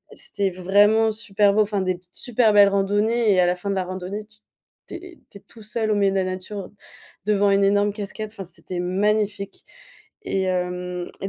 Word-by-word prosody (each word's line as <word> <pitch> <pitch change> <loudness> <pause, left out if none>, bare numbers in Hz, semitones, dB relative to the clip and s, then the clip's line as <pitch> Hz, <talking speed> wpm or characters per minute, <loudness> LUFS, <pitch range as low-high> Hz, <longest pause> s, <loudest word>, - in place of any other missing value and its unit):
C'était 195 -1 -2
vraiment 205 +5 +3
super 210 -2 +1
beau, 215 - +5
enfin 205 -1 0
des 185 -1 -1
super 235 -1 +1
belles 205 -1 +7
randonnées 205 +3 +1
et 185 - +2
à 175 - +3
la 180 - +1
fin 180 +3 -6
de - - -1
la 190 - 0
randonnée, 185 +3 -6
tu 215 -1 -23 0.5
tu - - -11
es 350 -1 -11
tu - - -11
es - - -29
tout 225 - -16
seul 215 +1 -2
au - - +2
milieu 200 -1 +2
de - - -3
la 190 - +2
nature 185 +1 -5 0.6
devant 205 -1 +2
une 200 0 +3
énorme 205 +1 +3
cascade, 210 +1 -6
enfin 205 -3 -8
c'était 175 0 -7
magnifique, 200 +2 -1 0.6
et 195 - -1
hem 180 -1 -3
et 195 - -3
200 Hz, 200 wpm, -23 LUFS, 185-215 Hz, 0.6 s, belles